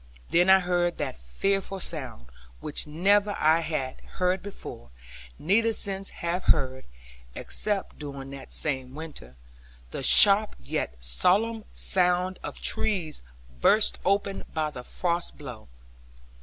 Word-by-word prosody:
Then 175 +2 +3
I 190 0 +7
heard 175 -1 0
that - - -4
fearful 195 - -2
sound, 130 - -5 0.3
which 150 0 0
never 200 +6 +2
I 160 +2 +3
had 155 -6 -4 0.2
heard 180 0 0
before, 195 - -10 0.5
neither 225 +7 +2
since 195 -2 +1 0.2
have 175 +2 -2
heard 130 -3 +1 0.5
(except 205 -2 -2
during 140 -2 -8
that 140 -1 -10
same 130 -3 0
winter), 150 - -10 0.6
the - - -5
sharp 205 +9 +7
yet 65 -2 -4
solemn 205 - +1
sound 180 0 +2
of - - -7
trees 180 -8 -2 0.4
burst 215 - +3
open 200 +1 0
by 155 -1 -1
the 125 -4 -9
frost 170 +4 -3
blow. 125 -7 -10
175 Hz, 125 wpm, -26 LUFS, 140-195 Hz, 0.6 s, I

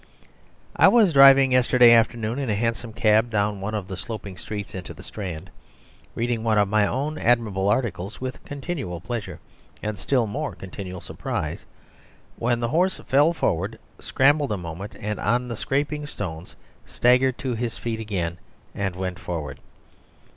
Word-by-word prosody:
I - - +6
was 215 -8 +5
driving 135 -1 +8
yesterday 125 -1 +6
afternoon 115 +1 +2
in 135 -4 -2
a 105 - +1
hansom 115 +2 -2
cab 110 +1 +3
down 105 -2 0
one 105 +3 -3
of 100 -3 -4
the 95 - -5
sloping 100 -1 -7
streets 100 +2 -6
into 95 -2 -7
the - - -12
Strand, 90 -7 -7 0.6
reading 115 -1 -1
one 110 -2 +2
of 100 -1 +4
my 105 0 +2
own 150 +6 -2
admirable 110 -5 +2
articles 105 -4 -1
with 130 0 -6
continual 140 - -5
pleasure, 115 +5 -5 0.4
and 105 -2 -3
still 125 +4 +1
more 140 +8 -4
continual 95 -1 -8
surprise, 75 -1 -5 0.7
when 120 0 0
the 120 - 0
horse 180 +6 +1
fell 145 +5 +4
forward, 100 - -1 0.2
scrambled 145 0 +2
a 105 - 0
moment 90 +3 -7 0.2
on 120 +3 +1
the 120 - -4
scraping 145 +5 -2
stones, 90 - -6 0.3
staggered 125 +1 +3
to 130 -2 -3
his 115 0 -3
feet 115 -1 -3
again, 90 -6 -3 0.3
and 95 -3 -2
went 90 -1 -4
forward. 75 -6 -5
110 Hz, 155 wpm, -24 LUFS, 100-130 Hz, 0.7 s, driving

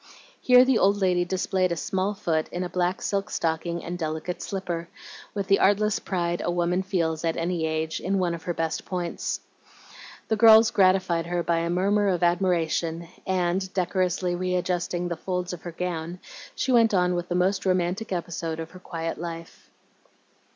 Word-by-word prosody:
Here 250 0 +7
the 255 -3 +3
old 200 +1 +4
lady 180 -3 +2
displayed 185 0 0
a - - +1
small 195 +3 -1
foot 160 -4 -1
in 180 - -3
a 180 - -4
black 180 +1 -1
silk 200 -1 -1
stocking 170 +1 -2
and 175 +1 -5
delicate 160 +2 -3
slipper, 175 -3 -4 0.5
with 200 -1 -1
the 195 +1 +3
artless 205 +2 +3
pride 175 -2 -2
a - - -1
woman 175 +1 +1
feels, 170 -5 -1
at 165 -1 0
any 170 -1 -1
age, 160 0 -2
in 195 +2 -1
one 180 -2 +1
of 170 - -6
her 175 - -1
best 165 -1 -2
points. 175 -2 -3 0.9
The 220 - +1
girls 220 0 +7
gratified 185 -3 +3
her 175 0 -1
by 170 -1 +1
a 170 0 -1
murmur 200 +4 +2
of 180 -2 +1
admiration, 170 -2 +1 0.2
and, 185 0 0
decorously 180 -1 0
readjusting 180 -1 -1
the 170 - -2
folds 180 +1 -3
of 175 - -7
her 175 - -6
gown, 170 0 -4 0.4
she 260 - -1
went 230 -4 +4
on 180 -1 +2
with 175 0 -3
the 175 - -1
most 190 +2 +1
romantic 185 +3 0
episode 170 -2 -3
of 165 0 -6
her 185 - -12
quiet 165 -3 -5
life. 165 -1 -8
180 Hz, 180 wpm, -26 LUFS, 170-190 Hz, 0.9 s, Here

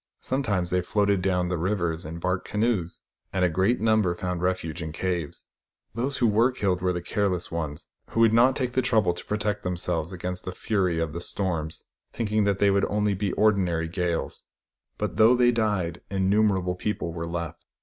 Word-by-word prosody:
Sometimes 105 -10 -1
they 90 0 +2
floated 100 +1 +1
down 90 -1 +1
the 90 -1 -2
rivers 85 -3 -1
in 80 +1 -6
bark 90 +2 -1
canoes; 105 -6 -1 0.3
and 90 -1 +2
a - - +2
great 95 +8 +1
number 110 -5 +2
found 90 -1 -3
refuge 90 -2 -2
in 80 -1 -4
caves. 85 -2 -3 0.5
Those 130 +4 -2
who 125 - +2
were 115 +3 +4
killed 95 -7 -1
were 90 0 +1
the 90 -1 -3
careless 95 -3 0
ones, 80 -2 -4 0.2
who 115 - 0
would 115 -1 +5
not 125 +3 +5
take 125 -2 -1
the 130 - +1
trouble 110 -8 +2
to - - -7
protect 105 0 -2
themselves 90 -2 -2
against 90 0 -4
the 95 - -5
fury 95 -5 0
of 80 -2 -2
the 85 - -4
storms, 85 -5 -2 0.3
thinking 110 -2 0
that 100 -1 +1
they 100 0 +4
would 100 0 +2
only 105 0 +1
be 100 0 -1
ordinary 90 -6 +2
gales; 85 0 -3 0.5
but - - -3
though 115 +3 +6
they 120 0 +4
died, 105 -8 -1
innumerable 95 -1 +2
people 90 -3 -3
were 85 0 -4
left. 85 -1 -5
95 Hz, 190 wpm, -26 LUFS, 85-105 Hz, 0.5 s, though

